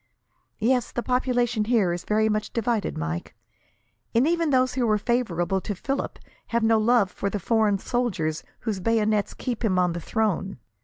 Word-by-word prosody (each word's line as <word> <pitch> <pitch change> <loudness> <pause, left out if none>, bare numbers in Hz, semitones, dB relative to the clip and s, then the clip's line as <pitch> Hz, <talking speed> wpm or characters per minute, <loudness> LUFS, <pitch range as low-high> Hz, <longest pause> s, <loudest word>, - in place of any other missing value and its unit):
"Yes; 245 +2 +1
the 240 - -3
population 245 -3 +1
here 215 -7 +2
is 175 - -5
very 215 +1 +2
much 215 -1 -1
divided, 230 -2 -1
Mike, 80 +2 -4 0.8
and 245 +5 +4
even 335 -1 +1
those 255 -2 +3
who 250 -3 +1
are 215 - +4
favourable 195 -6 0
to 205 - -4
Philip 275 +9 -3 0.3
have 235 -1 0
no 225 0 +4
love 220 -3 +3
for 200 - -2
the 205 - -2
foreign 215 0 +2
soldiers 190 -9 -1 0.2
whose 215 -5 -2
bayonets 215 0 +1
keep 245 -2 -4
him 195 -5 +2
on 180 -1 +2
the 170 - -5
throne. 195 -2 -1
220 Hz, 170 wpm, -25 LUFS, 195-245 Hz, 0.8 s, and